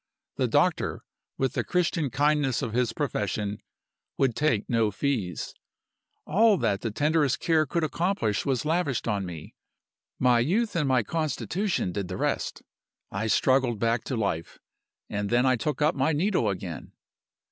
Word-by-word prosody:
The - - +1
doctor, - - +1 0.3
with 135 -2 0
the - - 0
Christian 165 -4 0
kindness 145 -1 +1
of 110 - -3
his 120 -1 +1
profession, 105 -5 -2 0.6
would 130 -4 +2
take 145 -9 +1
no 115 -3 +2
fees. 105 - -2 0.7
All 215 0 +4
that 100 - 0
the 115 - -2
tenderest 150 +3 +1
care 160 -2 +2
could 170 +5 -1
accomplish 155 - 0
was 135 0 -1
lavished 155 -7 0
on 100 -4 -1
me; 85 -3 -9 0.6
my 125 -2 +4
youth 200 - +1
and 150 -4 +1
my 130 -3 +3
constitution 165 - -1
did 100 0 -3
the 90 0 -5
rest. - - -2 0.5
I 105 +3 -2
struggled 130 +1 +2
back 115 +2 0
to 130 - -2
life 85 -7 -2 0.5
and 100 0 -3
then 120 +2 +3
I 130 -1 +4
took 150 +5 -1
up 155 - +3
my 135 +4 +1
needle 165 - +1
again. 90 -3 -6
130 Hz, 155 wpm, -27 LUFS, 105-155 Hz, 0.7 s, All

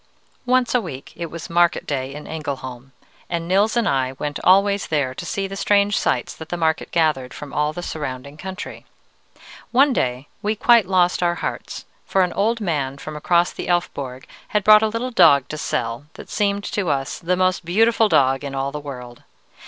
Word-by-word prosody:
"Once 255 -1 +2
a 250 - +3
week 140 -9 -8
it 170 - -4
was 165 0 -8
market 175 0 +2
day 135 -2 -3
in 150 +2 -8
Engelholm, 135 -4 -6 0.4
and 170 -1 -3
Nils 205 +5 +2
and 235 -3 +2
I 130 -1 0
went 145 +1 -4
always 200 +1 +4
there 140 -5 0
to - - -7
see 195 - -2
the 195 0 -6
strange 200 +1 +2
sights - - 0
that 160 -1 -9
the 175 - -3
market 160 -1 0
gathered 155 -6 0
from 145 -2 -9
all 150 0 +1
the 175 +3 -7
surrounding 140 -3 -5
country. 190 +3 -8 0.8
One 270 +2 +4
day 125 - -1
we 210 +1 0
quite 230 -2 +4
lost 180 -2 +2
our 175 -1 +2
hearts, - - -5 0.2
for 190 - +3
an 180 - -1
old 225 +3 +1
man 145 -9 -2
from 155 +2 -8
across 170 +3 +2
the - - -6
Elfborg 140 -7 -2 0.2
had 210 -1 0
brought 215 +1 +8
a 220 - +2
little 230 +3 -3
dog 160 - +5
to 155 - -5
sell, 115 +3 -3
that - - -11
seemed 200 -1 0
to 195 -5 -2
us 135 -1 -2
the 180 +2 0
most 185 -1 +1
beautiful 220 +5 +3
dog 135 -3 +3
in 140 -1 -5
all 135 +1 -2
the 150 - -5
world. 125 -4 -9
170 Hz, 195 wpm, -21 LUFS, 140-200 Hz, 0.8 s, brought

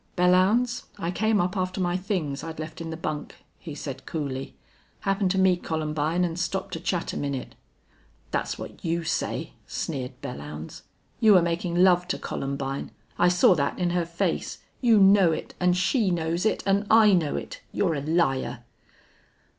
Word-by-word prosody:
"Belllounds, 195 +8 +3
I 170 - -2
came 220 +3 +1
up 180 +2 0
after 185 0 -2
my 175 -1 0
things 180 -7 -2
I'd 165 -1 -6
left 155 +1 -6
in 165 - -5
the 160 - -5
bunk," 150 -2 -4 0.2
he 155 -4 -8
said, 135 -2 -7
coolly. 135 -4 -4 0.5
"Happened 195 -1 +1
to 190 - 0
meet 185 -2 +3
Columbine 155 +2 0
and 170 0 -4
stopped 190 +2 -2
to 165 - -3
chat 175 0 -2
a - - -4
minute." 140 -3 -3 0.8
"That's - - -2
what - - -9
you 170 0 -1
say," - - -2
sneered 130 -5 -4
Belllounds. 75 - -7 0.4
"You 220 -3 +6
were 180 - +7
making 170 +1 -1
love 180 0 +4
to 185 - -1
Columbine. 135 0 -4 0.3
I 175 - +5
saw 180 +1 +5
that 140 -4 -1
in 175 -1 0
her 175 -1 0
face. 170 0 -2 0.2
You 235 -4 +5
know 195 -3 +6
it - - -5
and 180 0 +3
she 195 +3 +2
knows 170 +2 0
it - - -1
and 200 +1 +2
I 220 -2 +7
know 165 -5 +1
it.... - - -6
You're 180 -5 +1
a 145 - -2
liar!" 135 -6 0
175 Hz, 175 wpm, -26 LUFS, 155-185 Hz, 0.8 s, were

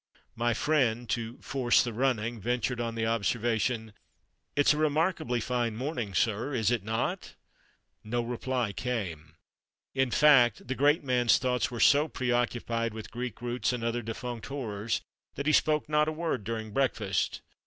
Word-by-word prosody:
My 120 0 +1
friend, 125 -5 +1
to 115 0 -3
"force 130 -3 +3
the 120 - -4
running," 120 -2 0
ventured 120 +2 -1
on 115 -1 -3
the 115 -1 -1
observation 115 0 0 0.6
"It's 145 +1 +5
a - - -3
remarkably 155 -3 +1
fine 120 -1 -1
morning, 120 - -3
sir, 115 +8 0
is 115 -1 +2
it 120 -4 +1
not?" 110 +2 -2 0.7
No 120 +3 -1
reply 120 -2 -2
came. 90 -12 -4 0.6
In 130 -1 +1
fact, 125 -6 +5
the 130 - -1
great 145 +4 +3
man's 125 -3 +3
thoughts 125 -1 0
were 120 -2 -6
so 145 +5 +5
preoccupied 120 -3 -1
with 110 - -8
Greek 120 -1 -5
roots, 120 +1 0
and 120 -2 -3
other 115 +1 -1
defunct 115 +1 -6
horrors, 115 -6 -3 0.3
that 140 - -4
he 155 - +3
spoke 155 -1 +3
not 150 0 +2
a - - 0
word 155 -7 -2
during 110 -1 -4
breakfast. 105 -6 0
120 Hz, 155 wpm, -29 LUFS, 115-130 Hz, 0.7 s, It's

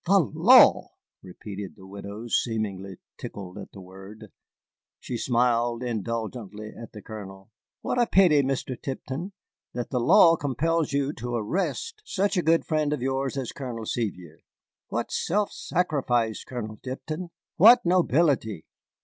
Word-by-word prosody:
"The 195 +3 +5
law!" 190 - +5 0.3
repeated 100 +1 -8
the 95 - -15
widow, 100 +3 -8
seemingly 100 -5 -2 0.2
tickled 95 -1 -8
at - - -10
the 100 - -11
word. 95 +3 -12 0.7
She 125 - -6
smiled 120 0 +1
indulgently 110 -2 -4
at 115 - -10
the 105 - -10
Colonel. 95 -2 -10 0.3
"What 245 - 0
a 240 - +2
pity, 175 -7 +5
Mr. 135 -1 -2
Tipton, 140 +7 -5 0.4
that 120 -1 -4
the 125 - 0
law 165 +7 +6
compels 155 +3 0
you 140 +1 0
to 120 -2 -5
arrest 195 - -2
such 200 - -1
a 180 - +2
good 165 0 +2
friend 155 -2 0
of 130 - -3
yours 135 +1 -1
as 130 -3 -3
Colonel 120 -5 -6
Sevier. 90 -9 -4 0.5
What - - -3
self 205 +4 0
sacrifice, 130 -10 -1
Colonel 110 -4 -6
Tipton! 155 +7 -6 0.3
What 235 +6 +7
nobility!" 150 - +2
125 Hz, 140 wpm, -26 LUFS, 110-160 Hz, 0.7 s, What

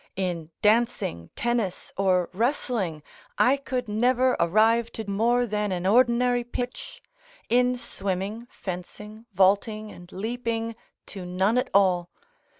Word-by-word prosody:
In 175 -4 -3
dancing, 215 - +1
tennis, 235 -6 -2
or 185 -2 +1
wrestling, 220 - -1 0.3
I 255 +2 +5
could 255 -3 -4
never 250 +4 +2
arrive 220 +6 +3
to 220 -2 -6
more 235 +5 +2
than 210 -2 -1
an 180 -1 -2
ordinary 245 +3 +3
pitch; 245 +1 -6 0.5
in 250 +1 +3
swimming, 200 +1 -4
fencing, 210 +5 -8
vaulting, 205 +3 +2
and 175 0 -13
leaping, 230 +2 -3 0.3
to 195 -3 -8
none 190 +6 +1
at - - -2
all. 180 -3 +3
215 Hz, 120 wpm, -26 LUFS, 190-240 Hz, 0.5 s, I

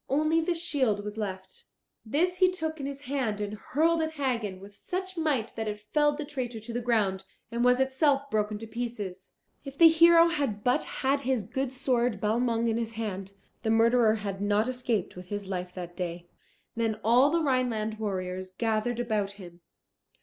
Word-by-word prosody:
Only 310 +4 +2
the 340 +2 0
shield 265 -11 0
was 210 0 -6
left. 190 -3 -6 0.4
This 345 +10 0
he 370 0 +5
took 320 -3 -3
in 275 - -3
his 280 0 -6
hand 260 -7 -2
and 205 0 -3
hurled 320 +10 +1
at 315 0 -2
Hagen 235 -10 -2
with 200 +2 -12
such 370 - -5
might 290 -9 -1
that 220 -1 -3
it 210 0 -3
felled 295 -1 +3
the 300 - -4
traitor 255 -5 -4
to 220 +2 -8
the 240 - -2
ground, 210 -5 +1 0.3
and 235 +1 0
was 250 +1 +4
itself 275 +1 +2
broken 210 0 0
to 225 - -7
pieces. 215 -5 -5 0.3
If 275 -1 -9
the 330 0 +9
hero 335 +1 +7
had 275 -11 -2
but 250 - +2
had 275 +1 0
his 260 -4 0
good 265 +6 -3
sword 245 -4 0
Balmung 230 +2 +1
in 225 0 +1
his 230 -1 -3
hand, 200 -3 -5 0.3
the 220 - -1
murderer 225 0 +4
had 200 -2 -4
not 205 +2 +2
escaped 245 -6 -2
with 180 0 -10
his 205 +1 -4
life 180 -1 -4
that 175 -1 -7
day. 175 -1 -5 0.5
Then 225 -2 -1
all 245 +5 +5
the 335 +1 +1
Rhineland 235 -6 0
warriors 185 -3 -3
gathered 225 +3 -1
about 215 -4 -1
him. 175 -3 -13
230 Hz, 185 wpm, -28 LUFS, 205-275 Hz, 0.5 s, the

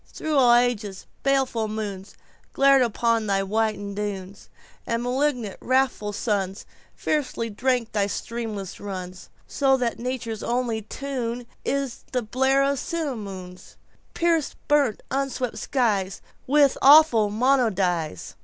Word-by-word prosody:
Through 310 -1 -3
all 245 -3 +6
ages 220 -6 0 0.2
baleful 265 -5 +1
moonsGlared 215 +6 0
upon 230 -1 +1
thy 195 -1 +1
whited 205 0 -1
dunes; 200 -1 -6 0.4
And 230 +1 -1
malignant, 250 -4 -1
wrathful 255 -5 +1
sunsFiercely 210 +4 -3
drank 245 -1 0
thy 205 -2 +1
streamless 215 -3 -5
runs; 185 -2 -7 0.2
So 270 -1 +2
that 240 -2 -2
Nature's 235 -3 -4
only 235 -2 -1
tuneIs 245 +2 -4
the 250 -1 0
blare 265 +5 +2
of 275 - +2
the 280 - -2
simoon, 205 - -5 0.6
Piercing 335 -3 +1
burnt 285 -7 +2
unweeping 270 -2 -1 0.2
skiesWith 235 +4 +1
its 275 - -1
awful 275 -7 +7
monodies. 200 - 0
235 Hz, 110 wpm, -24 LUFS, 205-265 Hz, 0.6 s, awful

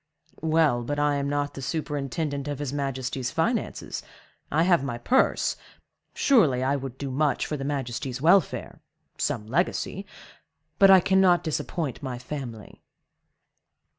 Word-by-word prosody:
"Well, 155 -6 +2
but 145 +5 -3
I 145 -1 +2
am 140 0 -1
not 145 0 -1
the 135 - -7
superintendent 145 0 -3
of 145 -1 -3
his 145 -1 -4
majesty's 130 -2 -2
finances—I 160 +3 -3
have 175 -5 +3
my 120 -4 -3
purse—surely 165 - +1
I 135 +2 +1
would 135 -2 -6
do 140 -1 -4
much 145 0 +1
for 150 - -3
his 135 -1 -4
majesty's 130 -2 -3
welfare—some 160 - 0
legacy—but 190 - -1
I 190 -1 +8
cannot 190 -1 +4
disappoint 155 -2 -3
my 130 -3 -4
family." 125 -4 -8
145 Hz, 120 wpm, -26 LUFS, 130-160 Hz, -, I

